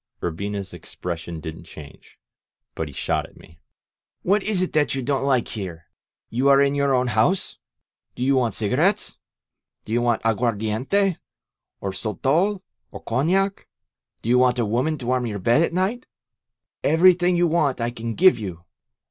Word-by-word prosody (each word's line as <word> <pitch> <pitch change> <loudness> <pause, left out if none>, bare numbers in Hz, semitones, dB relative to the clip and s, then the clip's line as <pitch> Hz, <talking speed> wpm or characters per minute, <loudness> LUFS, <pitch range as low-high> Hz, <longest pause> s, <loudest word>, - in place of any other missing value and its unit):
Urbina's 100 +3 -4
expression 85 -1 -6
didn't 80 +1 -8
change, 75 -2 -13 0.6
but 80 - -4
he - - -9
shot - - -2
at - - -22
me: 80 0 -18 0.7
^^What 200 +3 +3
is 195 -3 0
it 185 - -4
that 150 -2 +2
you 135 - -3
don't 135 +1 0
like 130 -4 +1
here? 90 -7 -7 0.4
You 125 +4 +1
are 140 0 +6
in 140 0 +3
your 140 -1 +2
own 125 0 +2
house! 120 - +1 0.6
Do 125 - -3
you 135 +1 +3
want 120 -3 +1
cigarettes? 140 - +1 0.7
Do 110 - -5
you 120 - +2
want 120 -1 +1
aguardiente, 115 - 0 0.6
or 100 - -2
sotol, 150 - 0 0.3
or - - -10
cognac? 185 - 0 0.6
Do 115 - -3
you 125 +1 +5
want 125 0 +3
a 120 - +1
woman 125 +9 0
to 130 - -8
warm 125 0 0
your 105 -2 -4
bed 120 - +3
at 170 - +1
night? 190 +8 -1 0.8
Everything 180 +2 +4
you 175 0 +3
want 155 -6 +1
I 120 +1 -1
can 115 -1 -5
give 185 -6 +5
you! 90 -5 -6
125 Hz, 165 wpm, -23 LUFS, 105-160 Hz, 0.8 s, are